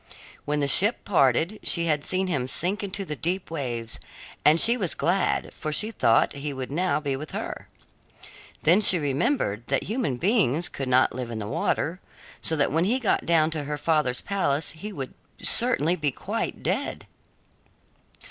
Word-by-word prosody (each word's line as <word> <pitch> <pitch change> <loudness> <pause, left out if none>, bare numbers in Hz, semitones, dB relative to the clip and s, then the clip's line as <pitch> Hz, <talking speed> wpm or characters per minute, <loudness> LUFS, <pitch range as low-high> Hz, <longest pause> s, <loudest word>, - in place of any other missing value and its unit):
When 150 0 -1
the 140 - +1
ship 205 - +4
parted, 165 - +2
she 170 -1 +3
had 150 -3 0
seen 185 +4 -1
him 140 -9 -1
sink 185 +10 -1
into 195 0 -4
the 150 - -5
deep 180 +4 -3
waves, 120 -7 -5 0.4
and 155 +2 +5
she 235 +6 +6
was 195 -9 -2
glad, 185 +3 0
for 155 - -5
she 215 +8 -2
thought 115 - +2
he 140 +1 -5
would 130 0 -6
now 170 -1 0
be 140 -3 -2
with 150 +3 -8
her. - - -6 1.0
Then 175 +7 +5
she 190 -3 +6
remembered 140 - -1
that - - 0
human 210 - -2
beings 175 - +1
could 135 -2 -5
not 130 +1 +3
live 125 -2 -5
in 115 - -5
the 105 -2 -5
water, 165 - -1 0.4
so 160 - +1
that 145 -2 +1
when 165 +4 +1
he 235 +6 +1
got 245 -6 0
down 165 -2 +3
to 155 -2 -3
her 150 +1 -3
father's 150 -5 +1
palace 160 -7 -1
he 200 +7 -8
would 135 -8 -6 0.3
certainly 180 - +3
be 150 -5 -1
quite - - -4
dead. - - -2
155 Hz, 175 wpm, -25 LUFS, 140-185 Hz, 1.0 s, she